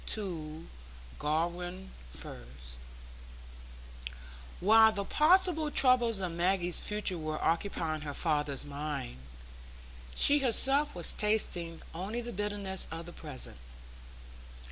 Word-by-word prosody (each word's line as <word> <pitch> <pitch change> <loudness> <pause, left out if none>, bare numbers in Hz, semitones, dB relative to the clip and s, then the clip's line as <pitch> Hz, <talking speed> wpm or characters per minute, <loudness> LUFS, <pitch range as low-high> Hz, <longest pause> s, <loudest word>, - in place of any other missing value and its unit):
To 165 -6 -4 0.5
Garum 175 +4 -2 0.2
Firs 60 -1 -8 1.8
While 220 +3 +6
the 200 -2 -3
possible 320 - +3
troubles 245 -6 +4
of 185 -2 -3
Maggie's 175 +1 +2
future 210 -4 -1
were 155 -1 -3
occupying 165 -2 -1
her 145 -2 -6
father's 150 -4 0
mind, 145 - -5 1.0
she 290 +1 +6
herself 270 +2 +2
was 175 -2 0
tasting 175 -6 -1
only 195 +8 -4
the 240 0 -6
bitterness 205 -1 -2
of 165 +1 -6
the 175 - -10
present. 140 - -6
180 Hz, 100 wpm, -31 LUFS, 155-215 Hz, 1.8 s, While